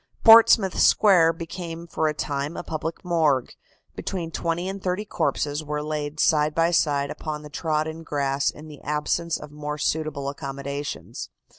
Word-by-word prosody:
Portsmouth 225 -4 +7
Square 175 -6 +5
became 165 0 -7
for 160 -2 -1
a 155 - 0
time 145 +1 -3
a - - -4
public 160 +2 -5
morgue. 155 -7 +1 0.4
Between 170 -4 -4
twenty 170 +2 -2
and 195 0 -5
thirty 185 +3 -2
corpses 155 -4 -1
were 150 0 -3
laid 150 0 -4
side 150 -1 +3
by 165 +1 +3
side 145 -4 +1
upon 150 -1 -5
the 150 - -11
trodden 155 +1 -2
grass 140 -3 0
in 150 +1 -9
the 150 -2 -12
absence 150 +3 -1
of 145 - -10
more 150 0 -5
suitable 150 -2 -2
accommodations. 140 +1 -5
155 Hz, 155 wpm, -24 LUFS, 145-170 Hz, 0.4 s, Portsmouth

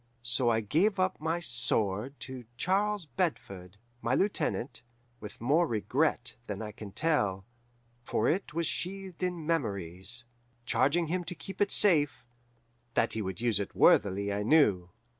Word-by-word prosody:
So 120 +1 +3
I 115 -1 +2
gave 180 - +1
up 185 -3 0
my 165 +2 0
sword 120 - -1
to 130 -2 -7
Charles 200 +2 +1
Bedford, 100 - -3 0.2
my 125 +2 +1
lieutenant, 140 - 0 0.4
with 105 -1 -9
more 150 +9 +3
regret 125 +3 0
than 105 -2 -4
I 110 -1 -5
can 105 -2 -9
tell, 105 -11 +1 0.6
for - - 0
it 190 +5 0
was 165 +2 -1
sheathed 190 +2 -4
in 180 -3 -2
memories, 105 - -2 0.4
charging 165 +7 +2
him 175 +3 -1
to 180 - -6
keep 195 +3 -8
it 205 - +4
safe 145 -10 +3 0.7
that - - +2
he 110 - -2
would 95 +1 -5
use 115 -4 +2
it 100 - -5
worthily 100 +1 +4
I 100 - -1
knew. 105 - +3
130 Hz, 150 wpm, -30 LUFS, 105-170 Hz, 0.7 s, it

